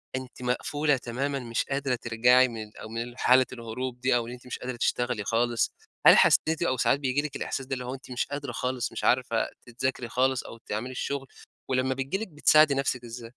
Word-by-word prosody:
أنتِ 130 -1 -7
مقفولة 145 +3 0
تمامًا، 135 +4 -3
مش 115 -2 -2
قادرة 135 -2 -1
ترجعي 120 +2 +4
من 115 -2 -6
ال 105 - -15
أ - - -8
من 120 +2 -5
حالة 130 +1 +5
الهروب 125 +1 -5
دي، 125 -1 +3
أو 115 -1 0
إن - - -7
أنتِ 125 0 -12
مش - - -5
قادرة 125 0 -5
تشتغلي 120 -2 0
خالص. 120 +2 +1 0.4
هل - - +10
حسيتِ، 160 +1 +4
أو 130 - 0
ساعات 135 +3 +2
بييجي 135 +1 0
لِك 150 -2 -6
الإحساس 135 - -3
ده، 135 - -4
اللي 125 -1 -3
هو 125 - -4
أنتِ 130 -1 -10
مش 125 - -1
قادرة 145 0 -5
خالص، 125 -1 -2
مش - - -6
عارفة 125 -2 +2
أنتِ 125 - -11
تذاكري 125 -2 -1
خالص، 130 +1 +1
أو 115 - -10
تعملي 115 +3 -5
الشغل، 135 +1 -3 0.4
ولما 130 0 +1
بتيجي 135 +7 -2
لِك، 220 - -5
بتساعدي 155 -2 +5
نَفْسِك 130 -2 -1
إزاي؟ 120 0 -8
125 Hz, 215 wpm, -27 LUFS, 120-135 Hz, 0.4 s, هل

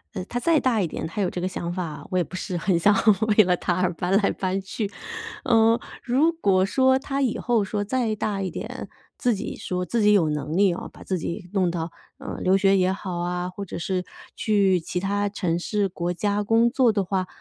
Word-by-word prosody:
呃， 185 -2 -4
他 240 - -3
再 320 +5 +3
大 240 -6 +1
一 180 - 0
点， - - -5
他 205 +6 -3
有 185 - +1
这 180 - -5
个 180 - -1
想 175 -2 -4
法， 170 -4 -5
我 185 - -1
也 180 - +3
不 180 - -10
是 185 -1 -3
很 175 +1 +1
想 205 +5 +5 0.5
为 215 - +9
了 180 -1 +2
他 175 0 -1
而 180 -1 +1
搬 180 +4 +1
来 205 - +2
搬 190 0 -2
去。 200 +2 -4 0.5
呃， 225 0 +4 0.2
如 270 +6 +3
果 195 - +2
说 260 +5 +3
他 275 +1 -2
以 250 -4 0
后 230 -4 +1
说 205 +1 -2
再 225 +1 0
大 205 -1 -2
一 190 - -2
点， - - -7 0.3
自 245 -2 +1
己 195 - -5
说 180 0 -3
自 235 +2 0
己 210 0 +5
有 180 -6 +4
能 150 0 -3
力 190 -1 +4
啊， - - -6
把 - - -14
自 190 - -2
己 170 +2 -5
弄 185 -3 +2
到， 170 -1 -3 0.3
呃， - - -6
留 190 +1 +4
学 195 0 +4
也 185 0 +2
好 190 -2 -5
啊， 180 +1 -2
或 190 +2 -6
者 190 - -6
是 180 +1 -2 0.3
去 200 -4 +2
其 180 +2 -3
他 200 +1 0
城 180 -5 -1
市 200 +3 0
国 175 -1 -3
家 205 +3 0
工 230 +3 +4
作 255 -2 +3
的 200 -2 0
话， 185 0 -1
195 Hz, 250 characters per minute, -24 LUFS, 180-215 Hz, 0.5 s, 为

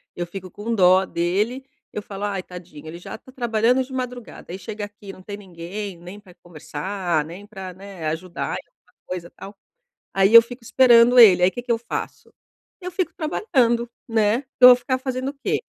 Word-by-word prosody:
Eu 175 - -3
fico 185 +1 -9
com 220 +3 -4
dó 185 -2 +5
dele. 205 +10 -1 0.3
Eu 210 - -4
falo: 200 0 -6
"ai, 195 -3 -3
tadinho, 175 -4 -12
ele 165 - -8
já - - -8
tá 260 - -17
trabalhando 240 0 +1
de 260 - -14
madrugada, 250 -7 -6
aí, 185 - -6
chega 215 0 -6
aqui 205 -1 -12
não 185 - -14
tem 205 +1 -7
ninguém 190 +1 -7
nem 180 +4 -11
para 190 -3 -18
conversar, 175 +1 -3
nem 175 +6 -10
para, 190 -3 -8
né, 190 -2 -10
ajudar 170 +3 -4
em - - -10
alguma - - -36
coisa, 175 -2 -6
tal. 200 +1 -11 0.6
Aí 195 +2 +3
eu 230 - +12
fico 240 +1 -11
esperando 240 0 +6
ele, 185 -6 +8
aí 185 - +5
que 245 - -6
que 245 0 -3
eu 230 - +2
faço? 235 +1 -7 0.5
Eu 360 - -6
fico 350 -2 -2
trabalhando, 245 - 0 0.2
né? 220 +1 +2
Que 260 - -42
eu 250 - +12
vou 250 - +9
ficar 255 +1 -2
fazendo 260 0 -3
o - - -23
quê? - - 0
205 Hz, 200 wpm, -22 LUFS, 185-240 Hz, 0.6 s, eu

